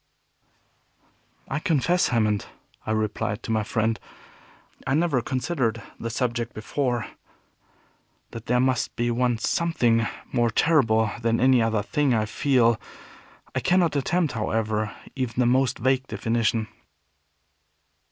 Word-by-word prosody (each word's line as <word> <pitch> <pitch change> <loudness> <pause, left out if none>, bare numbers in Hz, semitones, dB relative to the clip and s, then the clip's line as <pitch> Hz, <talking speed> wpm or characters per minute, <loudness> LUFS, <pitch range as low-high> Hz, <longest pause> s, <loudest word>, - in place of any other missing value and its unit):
"I 145 - -2
confess, 160 +3 +2
Hammond," 110 -4 +1 0.4
I - - 0
replied 110 0 -1
to - - -4
my 110 -1 +2
friend, 110 +2 0 0.9
"I 135 - +2
never 155 -6 +2
considered 125 -2 -1 0.2
the 115 - -4
subject 120 0 -2
before. 120 0 -1 1.3
That 115 -1 -9
there 125 +1 +2
must 130 -2 0
be 120 0 0
one 120 0 +1
Something 120 -4 +1 0.3
more 120 -1 +2
terrible 110 -6 +3
than 115 0 +1
any 130 -1 +5
other 110 -2 +1
thing, 145 -2 +1
I 110 -1 +1
feel. 120 -1 +2 0.7
I - - 0
cannot 175 -3 +2
attempt, 160 +2 +1
however, 110 -1 -1 0.2
even 130 -4 -3
the 125 - +3
most 130 +2 +2
vague 130 +2 +1
definition." 115 -1 0
120 Hz, 125 wpm, -25 LUFS, 110-135 Hz, 1.3 s, any